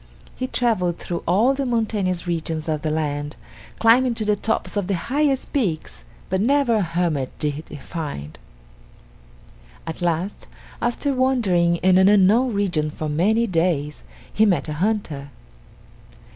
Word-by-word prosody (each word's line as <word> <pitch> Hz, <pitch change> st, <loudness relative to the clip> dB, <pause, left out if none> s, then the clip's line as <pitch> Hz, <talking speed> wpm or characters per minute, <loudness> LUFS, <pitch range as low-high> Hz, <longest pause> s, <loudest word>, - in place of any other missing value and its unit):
He 255 Hz, -, -3 dB
traveled 195 Hz, -10 st, 0 dB
through 170 Hz, -1 st, -4 dB
all 215 Hz, +10 st, +4 dB
the 275 Hz, 0 st, -2 dB
mountainous 215 Hz, -8 st, -1 dB
regions 165 Hz, -2 st, -3 dB
of 155 Hz, -2 st, -1 dB
the 155 Hz, -, -1 dB
land, 145 Hz, -1 st, -2 dB, 0.4 s
climbing 235 Hz, +2 st, +4 dB
to 220 Hz, -, -3 dB
the 210 Hz, 0 st, +2 dB
tops 220 Hz, +2 st, -2 dB
of 200 Hz, -3 st, -1 dB
the 195 Hz, -, 0 dB
highest 270 Hz, -, -1 dB
peaks, 165 Hz, -, -2 dB, 0.2 s
but 190 Hz, -, 0 dB
never 265 Hz, -1 st, +3 dB
a -, -, +1 dB
hermit 165 Hz, -6 st, -1 dB
did 150 Hz, 0 st, -2 dB
he -, -, -8 dB
find. 140 Hz, -, -6 dB, 1.5 s
At 165 Hz, -, -6 dB
last, 175 Hz, +3 st, -2 dB, 0.3 s
after 255 Hz, +4 st, 0 dB
wandering 220 Hz, -10 st, +2 dB
in 185 Hz, 0 st, +5 dB
an 190 Hz, +1 st, +6 dB
unknown 210 Hz, +5 st, +4 dB
region 180 Hz, -7 st, 0 dB
for 155 Hz, 0 st, -5 dB
many 210 Hz, +10 st, +2 dB
days, 165 Hz, -6 st, 0 dB, 0.3 s
he 215 Hz, -, +3 dB
met 195 Hz, -7 st, +2 dB
a 150 Hz, -, -3 dB
hunter. 160 Hz, -6 st, -2 dB
185 Hz, 145 wpm, -22 LUFS, 160-225 Hz, 1.5 s, an